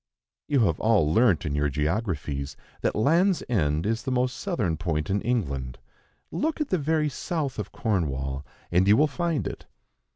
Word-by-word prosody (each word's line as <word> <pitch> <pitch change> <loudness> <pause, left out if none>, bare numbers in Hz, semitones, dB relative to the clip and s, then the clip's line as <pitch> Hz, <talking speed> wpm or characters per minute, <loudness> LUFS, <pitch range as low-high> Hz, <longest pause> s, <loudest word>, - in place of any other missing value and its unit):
You 140 -4 +3
have 85 -8 +2
all 100 -9 +3
learnt, 110 -5 +4
in 75 - -1
your 75 0 +1
geographies, 75 - -2 0.2
that - - 0
Land's 170 - +3
End 80 -8 +1
is 115 +2 0
the 125 - -4
most 125 0 +1
southern 170 - -1
point 80 -1 -2
in 100 +1 +1
England; 70 - -2 0.5
look 315 +2 -1
at 300 - -1
the 185 - +1
very 155 +1 +1
south 145 0 -3
of - - -4
Cornwall, 70 - -1 0.3
and 90 +2 +3
you 105 +2 +6
will 150 - +5
find 165 +1 -1
it. - - -6
105 Hz, 170 wpm, -26 LUFS, -, 0.5 s, you